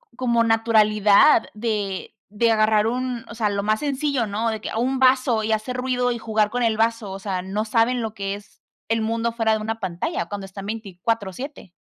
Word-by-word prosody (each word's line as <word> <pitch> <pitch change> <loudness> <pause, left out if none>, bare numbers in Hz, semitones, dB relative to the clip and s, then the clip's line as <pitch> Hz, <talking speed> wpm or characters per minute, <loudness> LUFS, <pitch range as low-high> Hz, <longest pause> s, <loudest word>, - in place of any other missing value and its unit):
como 235 -2 +2
naturalidad 215 -2 +4
de 210 -4 -3 0.2
de 230 +2 +2
agarrar 215 -1 +3
un 250 0 -2
o - - -9
sea, 215 -2 0
lo 200 0 -1
más 215 +3 0
sencillo, 280 -3 0
¿no? 220 +2 -1
De 220 -1 -5
que, - - -5
un 260 +2 0
vaso 255 -3 +3
y 220 - -1
hacer 220 +4 -1
ruido, 250 -1 0
y 235 - -4
jugar 215 -2 0
con 245 +1 -1
el 225 -2 +1
vaso. 225 -2 0
O 195 - -6
sea, 190 -2 -3
no 200 +4 -3
saben 230 +3 +2
lo 220 -2 -4
que 200 -2 -3
es 205 0 -15 0.3
el 225 0 0
mundo 230 +1 -1
fuera 225 -1 +1
de 220 - +2
una 225 +1 -3
pantalla, 195 - -3
cuando 200 -1 -6
están 195 +1 -9
24/7. 215 - -4
225 Hz, 205 wpm, -23 LUFS, 210-235 Hz, 0.3 s, naturalidad